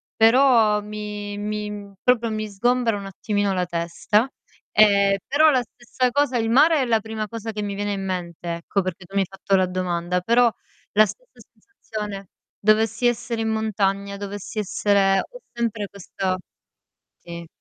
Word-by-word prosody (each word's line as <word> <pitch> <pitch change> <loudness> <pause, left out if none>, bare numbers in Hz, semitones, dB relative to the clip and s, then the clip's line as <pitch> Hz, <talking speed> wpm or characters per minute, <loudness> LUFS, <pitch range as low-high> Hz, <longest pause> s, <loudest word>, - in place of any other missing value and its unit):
però 225 -2 +5
mi 210 -1 -6
mi, 210 0 -3
mhmm, 200 -1 -8
proprio 235 -2 +2
mi 215 0 -3
sgombera 240 +2 +1
un 200 - -7
attimino 200 0 -1
la 180 -1 0
testa, 175 +7 0 0.4
ehm, 200 -2 +5
però 310 +2 +5
la 255 - +3
stessa 245 +2 -2
cosa 275 -2 +1
il 225 -1 0
mare 295 +4 +5
è - - +1
la 225 -2 +2
prima 220 0 -5
cosa 225 +1 -6
che 210 - -4
mi 200 -1 -3
viene 205 0 -2
in 195 -1 -4
mente, 175 -2 -4
ecco, 180 +4 -1
perché 185 0 -5
tu 195 - -19
mi 195 - +3
hai 190 - -1
fatto 195 0 -1
la 185 -1 +3
domanda, 180 -1 -1
però 235 +3 +4 0.4
la 215 +1 +6
stessa - - -11
sensazione 210 - -8 0.3
dovessi 220 +2 +2
essere 235 -1 0
in 220 - -1
montagna, 200 -2 -1
dovessi 205 +1 -7
essere 195 -1 +2
ho - - -7
sempre 230 -3 -2
questa 190 -1 -3 0.8
sì. 170 -1 -9
210 Hz, 165 wpm, -23 LUFS, 195-230 Hz, 0.8 s, la